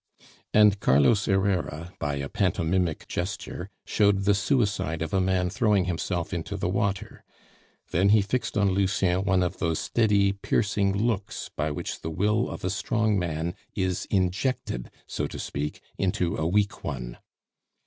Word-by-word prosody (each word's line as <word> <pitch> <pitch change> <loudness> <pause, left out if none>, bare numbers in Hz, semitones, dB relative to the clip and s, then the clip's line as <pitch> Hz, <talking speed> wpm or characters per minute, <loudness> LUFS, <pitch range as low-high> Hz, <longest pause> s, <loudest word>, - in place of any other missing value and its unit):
And 105 -1 +5
Carlos 85 - +4
Herrera, 95 -4 0
by 75 -1 -1
a 70 0 -3
pantomimic 90 -1 0
gesture, 95 +1 -4 0.2
showed 100 -2 +3
the 100 +1 +4
suicide 100 - 0
of 80 - -5
a 95 - +3
man 90 -1 +1
throwing 105 -4 +2
himself 90 0 -2
into 90 +3 -3
the 95 - -1
water; 100 +1 -2 0.7
then 95 +4 +3
he 105 -1 +5
fixed 120 +3 -2
on 100 -2 +3
Lucien 95 -1 +1
one 95 -2 +3
of 90 - -3
those 80 -1 0
steady, 105 -4 +2
piercing 100 0 0
looks 105 -2 -2
by 75 +1 0
which 75 - -4
the 80 - -4
will 105 +8 +1
of - - -6
a 95 - 0
strong 110 0 +1
man 85 -1 -2 0.2
is 95 -1 -1
injected, 95 - -1 0.2
so - - -3
to - - -8
speak, 75 +2 -4 0.2
into 90 -3 0
a 80 - -1
weak 100 +3 +1
one. - - -5
95 Hz, 155 wpm, -26 LUFS, 85-100 Hz, 0.7 s, And